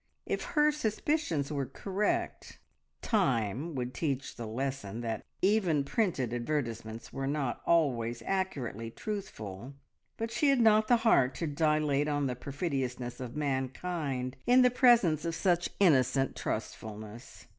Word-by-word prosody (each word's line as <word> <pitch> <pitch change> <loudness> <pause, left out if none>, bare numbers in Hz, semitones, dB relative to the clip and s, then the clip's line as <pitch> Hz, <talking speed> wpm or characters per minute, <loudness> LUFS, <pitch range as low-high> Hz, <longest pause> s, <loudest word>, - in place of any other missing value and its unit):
If - - -2
her 300 0 +6
suspicions 220 - -1
were 140 -3 -2
correct, 205 - -2 0.5
time 135 - 0
would 125 -1 -3
teach 140 0 -2
the 115 -2 -6
lesson 120 -2 -3
that 115 -1 -3 0.2
even 185 -8 +3
printed 140 - 0
advertisements 120 -3 -3
were 135 0 -3
not 140 -4 -2
always 120 -8 +2
accurately 135 - -2
truthful, 125 - -6 0.4
but 225 0 -3
she 290 +4 +2
had 275 -2 +4
not 220 -1 +5
the 240 - +5
heart 130 - +4
to 170 - -2
dilate 150 -1 +1
on 145 -1 0
the 125 -2 -1
perfidiousness 130 -3 -3
of 125 -1 -6
mankind 135 -1 -2
in 250 +1 +7
the 250 - +5
presence 235 - +4
of 165 -1 -2
such 175 0 +1
innocent 135 -7 +3
trustfulness. 110 +1 -6
140 Hz, 135 wpm, -31 LUFS, 125-190 Hz, 0.5 s, in